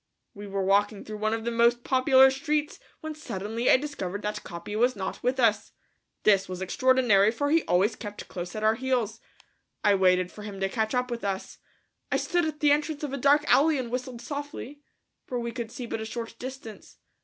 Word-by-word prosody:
We 205 0 -9
were 195 0 -2
walking 200 +1 +2
through 215 -1 -7
one 215 +1 0
of 225 0 -6
the 235 - 0
most 235 +1 +3
popular 265 0 +5
streets 295 +2 -2 0.2
when 315 0 -5
suddenly 225 -5 -3
I - - +7
discovered 210 -9 -5
that 210 0 -3
Capi 170 +4 -7
was 245 +3 +2
not 190 -2 -5
with 255 +2 0
us. 215 -4 +2 0.5
This 195 -3 +4
was 185 -1 -5
extraordinary, 240 -1 +3
for 285 +6 -1
he 330 +1 +4
always 190 +6 +2
kept 205 -2 -8
close 175 +1 -6
at 215 - -4
our 215 0 +4
heels. 235 -3 -1 0.6
I 205 - +5
waited 185 -1 +3
for 210 - -11
him 205 -2 -7
to 195 0 0
catch 220 +2 -1
up 250 0 0
with 235 -1 -4
us. 195 -1 -4 0.5
I - - +3
stood 350 -1 0
at 305 -1 -4
the 295 -1 +5
entrance 300 +1 0
of 285 -2 -3
a - - -2
dark 285 +3 +4
alley 310 +1 +4
and 245 -3 -4
whistled 250 -1 -4
softly, 290 0 -6 0.5
for 245 - -3
we 235 0 -3
could 235 -2 -5
see 250 - -6
but 225 -1 -4
a - - -4
short 230 +1 -6
distance. 255 -4 -9
235 Hz, 210 wpm, -27 LUFS, 205-265 Hz, 0.6 s, I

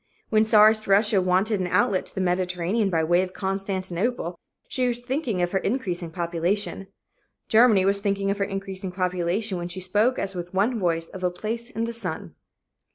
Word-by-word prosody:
When 215 0 +4
czarist 215 0 +5
Russia 200 0 +4
wanted 190 +3 +1
an 185 - -1
outlet 200 0 +1
to - - -11
the 190 - -1
Mediterranean 180 +3 0
by 165 -3 +1
way 175 +3 +3
of 185 0 -4
Constantinople, 190 +1 -2 0.3
she 255 -1 0
was 240 -1 -1
thinking 245 - -1
of 175 - -1
her 190 - +1
increasing 185 -7 -2
population. 175 +4 -2 0.6
Germany 220 -4 +5
was 200 +1 +2
thinking 200 -1 0
of 200 - -3
her - - +2
increasing 195 -1 -5
population 180 +2 -1
when 175 - -4
she 180 +2 -6
spoke 210 +7 +1
as 195 0 -3
with 175 0 -6
one 220 +5 +1
voice 165 -3 0
of 190 -1 -9
a 180 - +3
"place 225 +6 -4
in 225 - -3
the 230 0 -3
sun." 180 - -5
195 Hz, 185 wpm, -25 LUFS, 180-215 Hz, 0.6 s, czarist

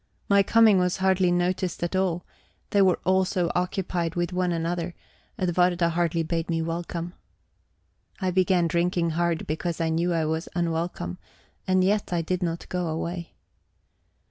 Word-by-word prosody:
My 200 0 +5
coming 220 -1 +5
was 180 -1 +1
hardly 190 -1 +2
noticed 175 0 0
at 175 +2 -2
all, 180 -2 0 0.5
they 200 - +4
were 185 -2 +4
all 190 0 +3
so 180 -2 0
occupied 180 -1 -1
with 175 0 -1
one 180 -1 0
another; 170 +1 -2 0.4
Edwarda 175 -1 +2
hardly 170 0 0
bade 165 +1 -2
me 165 -1 0
welcome. 170 +1 -4 1.1
I 185 -2 0
began 180 -1 +3
drinking 170 0 +1
hard 170 0 0
because 165 +2 -3
I 165 -1 +1
knew 170 +2 +1
I 165 -2 +1
was 160 +2 -2
unwelcome; 165 - -2 0.5
and 185 0 +3
yet 205 +1 +1
I 170 -1 0
did 180 +3 -2
not 170 -1 -3
go 180 -1 -2
away. 170 +2 -4
175 Hz, 155 wpm, -26 LUFS, 165-185 Hz, 1.1 s, My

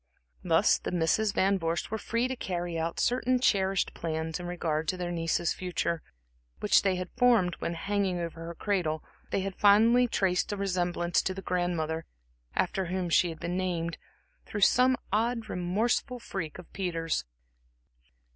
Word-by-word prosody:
Thus - - +4
the - - -4
Misses 180 +5 +2
Van 195 0 +2
Vorst 165 +2 -2
were 220 - -2
free 230 +4 0
to 260 - -3
carry 175 -6 -3
out 165 +1 -2
certain 255 +1 +2
cherished 195 -5 +2
plans 160 0 -3
in 175 - -6
regard 160 -3 -2
to 185 - 0
their 175 -1 -3
niece's 165 0 0
future, 175 -2 -2 0.6
which 210 - +4
they 190 -2 +1
had 180 0 -5
formed 235 -8 +4
when, 170 - -2
hanging 195 +1 0
over 165 -1 -5
her 170 - -6
cradle, 175 -7 -1 0.3
they 195 - 0
had 195 -1 -4
fondly 225 +5 +6
traced 190 -5 +1
a 205 - -2
resemblance 175 -3 0
to 185 - -2
the 195 - -7
grandmother 165 -3 -1 0.5
after 190 - 0
whom 180 0 -2
she 175 - +4
had 160 - -7
been 175 +2 -2
named, 170 -3 -2 0.5
through 210 - -4
some 255 +5 +5 0.2
odd, 230 +1 +1
remorseful 215 +8 0
freak 190 -9 -5
of 180 - -13
Peter's. 165 -4 -1
180 Hz, 165 wpm, -29 LUFS, 170-205 Hz, 0.6 s, fondly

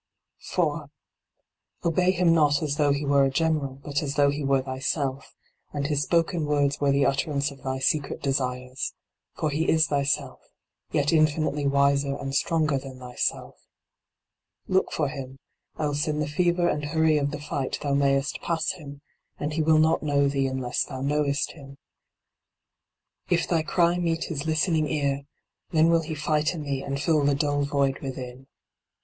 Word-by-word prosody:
4. - - -2 1.0
Obey 180 +2 +2
him 180 -2 +3
not 150 -2 +3
as 145 -1 -1
though 145 -2 +3
he 140 +1 -1
were 140 0 +4
a 135 - +3
general, 145 -1 0
but 145 +2 -1
as 140 -2 -3
though 145 -1 +4
he 145 +1 -4
were 135 -1 +2
thyself, 135 +1 -3 0.4
and 145 -1 -2
his 145 -1 0
spoken 165 +1 +1
words 145 -1 +1
were 140 -1 +3
the 140 0 +3
utterance 140 +1 0
of 135 -1 -14
thy 130 0 -2
secret 140 +2 0
desires; 130 -1 -2 0.4
for 155 - -1
he 155 +3 0
is 160 0 +4
thyself, 140 -2 -1 0.5
yet 145 +2 +1
infinitely 155 -2 +2
wiser 140 0 +2
and 135 -1 -5
stronger 155 -1 +1
than 130 -1 -10
thyself. 125 -1 -3 1.1
Look 190 0 +1
for 150 - 0
him, 135 -2 -7 0.4
else 145 -1 -1
in 150 -1 -1
the 150 - -1
fever 175 +3 +1
and 150 -3 -1
hurry 155 0 +2
of 140 0 0
the 145 0 -5
fight 145 -2 -3
thou 140 -1 0
mayest 140 0 +1
pass 165 -2 -1
him; 145 -5 -10 0.4
and 150 +1 -2
he 160 - 0
will 155 0 +4
not 160 +1 +3
know 140 -2 +2
thee 135 -1 0
unless 130 -2 -1
thou 130 -2 -7
knowest 145 0 0
him. 135 -3 -13 1.5
If 175 -1 +2
thy 165 -2 +2
cry 170 +2 +2
meet 165 -1 0
his 155 -2 -4
listening 160 0 +1
ear, 140 -2 -1 0.4
then 160 0 +4
will 165 -1 +4
he 160 0 -5
fight 150 +2 0
in 155 - -5
thee 140 -2 -2
and 140 0 -3
fill 150 0 +2
the 140 0 +3
dull 145 0 0
void 140 -1 0
within. 130 -1 -7
145 Hz, 170 wpm, -26 LUFS, 140-155 Hz, 1.5 s, were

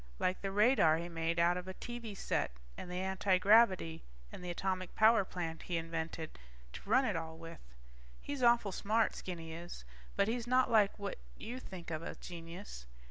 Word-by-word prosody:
Like 185 - 0
the 195 - -2
radar 205 -6 +5
he 170 +1 -5
made 165 0 -1
out 170 +1 +4
of 180 0 -6
a 190 - -6
TV 235 -4 -7
set - - 0 0.3
and - - -8
the 180 +1 -3
antigravity 190 -2 +4 0.3
and - - -9
the 180 - -5
atomic 185 +1 -2
power 220 -1 +6
plant 165 -3 -5
he 175 - -2
invented 165 - -4 0.3
to 195 - -10
run 260 +4 +5
it 210 -6 0
all 160 0 -4
with. 165 0 -9 0.6
He's 285 -2 -5
awful 235 -4 +4
smart, 215 +4 +1
Skinny 165 -3 -6
is, 170 - -8 0.3
but 200 - +3
he's 235 +1 -2
not 255 0 +3
like 210 -3 +4
what 200 - -5 0.2
you 245 +3 -6
think 180 -8 -9
of 155 0 -2
a - - -6
genius. 170 - -9
185 Hz, 185 wpm, -34 LUFS, 165-215 Hz, 0.6 s, power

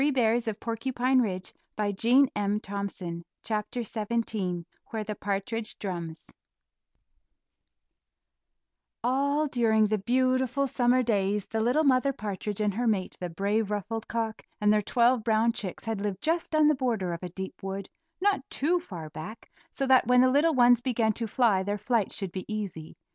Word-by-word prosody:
[Illustration: 235 -6 +2 0.6
WHERE 195 -7 0
THE - - -13 0.2
PARTRIDGE 230 +6 +3
DRUMS] 200 -4 -3 0.2
XVII 215 -4 -2 0.2
WHERE 220 -1 -3
THE 210 0 -4
PARTRIDGE 205 +3 -3
DRUMS 170 -5 -6 2.7
All 280 +4 +2
during 225 -5 +3
the 215 0 0
beautiful 255 +4 +1
summer 250 -1 +2
days 205 -3 0
the 225 - -3
little 250 +8 +2
Mother 275 -1 +3
Partridge 210 -3 -4
and 210 -1 +1
her 240 +4 -1
mate, 195 -4 0
the 180 - -4
brave, 200 +5 0
ruffled 215 +2 -3
cock, 225 -1 -2 0.2
and 210 0 +4
their 210 - +3
twelve 240 +2 +2
brown 225 +1 +3
chicks 190 -5 -5
had 225 -3 -2
lived 200 -2 -3
just 325 0 0
on 310 -1 +5
the 305 - +5
border 230 -10 -1
of 170 - -6
a 180 - -5
deep 190 +2 -7
wood, 195 0 -5 0.3
not 400 -2 +2
too 340 +6 +1
far 170 - -8
back, 165 +10 -9 0.2
so 275 - -2
that 260 -3 +5
when 250 0 +6
the 255 0 +5
little 300 +3 +3
ones 245 -1 +6
began 235 -4 +1
to 230 +1 -3
fly 220 -4 +3
their 205 +2 -2
flight 215 0 0
should 195 -4 -5
be 185 +4 -6
easy. 190 -7 -5
220 Hz, 155 wpm, -28 LUFS, 200-250 Hz, 2.7 s, when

